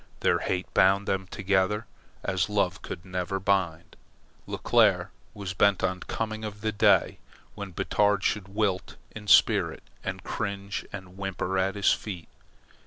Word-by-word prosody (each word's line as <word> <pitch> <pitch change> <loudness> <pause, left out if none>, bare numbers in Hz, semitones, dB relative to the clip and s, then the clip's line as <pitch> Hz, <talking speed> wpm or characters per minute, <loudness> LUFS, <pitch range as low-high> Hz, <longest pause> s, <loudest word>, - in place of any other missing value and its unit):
Their - - +3
hate 90 0 -1
bound 100 +2 +4
them 95 -1 -1
together 100 +3 0 0.4
as 95 +1 0
love 100 -2 0
could 85 - -7
never 90 +1 -2
bind. 95 -4 0 0.5
Leclere - - +3 0.2
was 100 -2 -5
bent 100 +1 +3
on 95 -1 0
the - - -10
coming 110 -1 -3
of 105 -1 -6
the 110 0 0
day 105 - +3 0.3
when 100 -1 -6
Batard 105 +4 +1
should 105 -3 0
wilt 100 -2 -1 0.2
in 105 -1 -10
spirit - - +4 0.2
and - - -4
cringe 100 0 -4
and 95 -2 -9
whimper 95 -1 -2
at 95 +1 0
his 100 -1 +4
feet. 90 -6 -6
95 Hz, 150 wpm, -27 LUFS, 95-105 Hz, 0.5 s, bound